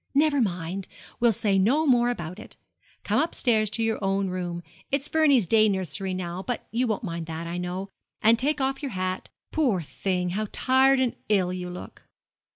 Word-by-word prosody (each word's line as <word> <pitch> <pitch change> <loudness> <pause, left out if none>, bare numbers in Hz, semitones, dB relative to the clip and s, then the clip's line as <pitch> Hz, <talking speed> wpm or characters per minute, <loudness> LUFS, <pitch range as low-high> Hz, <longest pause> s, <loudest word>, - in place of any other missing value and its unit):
'Never 290 -1 +4
mind. 185 -2 -2 0.3
We'll 235 -1 +5
say 200 -2 +1
no 265 +11 +3
more 245 -3 +4
about 180 -5 -4
it. - - -12 0.5
Come - - +2
upstairs 235 -9 +1
to 225 +2 -2
your 225 -2 -1
own 195 0 +1
room 175 -1 -4 0.3
it's 275 +1 0
Vernie's 295 -8 +4
day 215 +3 +4
nursery 190 -1 -2
now, 180 0 -4
but 245 +3 -4
you 245 +2 +1
won't 215 -1 -1
mind 170 -4 -4
that, 165 +1 -5
I 170 +1 -4
know 180 +2 -4 0.3
and 225 +1 +4
take 295 +3 0
off 270 0 -1
your 275 -6 -4
hat. 185 0 -3 0.2
Poor 255 - +2
thing, 180 +3 -2
how 215 +3 -2
tired 265 +1 +4
and 255 -2 +1
ill 185 -4 +2
you 180 -1 -4
look!' 180 0 -9
205 Hz, 185 wpm, -26 LUFS, 180-250 Hz, 0.5 s, We'll